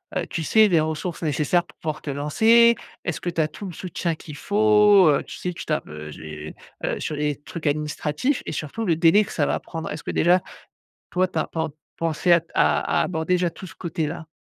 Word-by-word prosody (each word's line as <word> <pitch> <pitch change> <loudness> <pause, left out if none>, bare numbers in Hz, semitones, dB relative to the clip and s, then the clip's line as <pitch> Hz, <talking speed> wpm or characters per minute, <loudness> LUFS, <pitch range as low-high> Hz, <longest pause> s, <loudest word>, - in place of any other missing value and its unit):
heu, 185 - 0
tu 165 - -3
sais? 220 +6 +5
Les 175 -5 +3
ressources 160 +3 -3
nécessaires 155 +2 +1
pour - - -20
pouvoir 155 -1 -4
te - - -6
lancer? 225 +12 +4 0.3
Est-ce 175 - -3
que 175 - -2
tu 170 -1 0
as 155 - +2
tout 180 +6 -9
le 180 - -7
soutien 170 -1 -3
qu'il 155 -1 -10
faut, 210 -3 +5
heu, 145 - +2
tu - - -9
sais? 180 - -3
Tu 170 - -8
tapes 155 - -2
heu, 75 0 -8
j'ai 75 0 -8 0.4
sur 155 - -3
les 150 0 -1
trucs 155 +3 -7
administratifs 150 - -1
et - - -4
surtout 155 +9 -4
le 170 -5 +2
délai 165 +6 +5
que - - -9
ça 145 - +1
va - - 0
prendre? 165 -1 -6
Est-ce 150 - -6
que - - -3
déjà 180 +2 +4 0.7
toi 185 +1 +1
tu 175 -3 -3
as - - -1
pen 160 -1 -2 0.3
pensée 165 +2 0
à 170 - +5
à - - +2
aborder 180 +1 0
tout 190 - -10
ce 190 - -13
côté-là? 160 -2 -4
165 Hz, 215 wpm, -23 LUFS, 150-185 Hz, 0.7 s, sais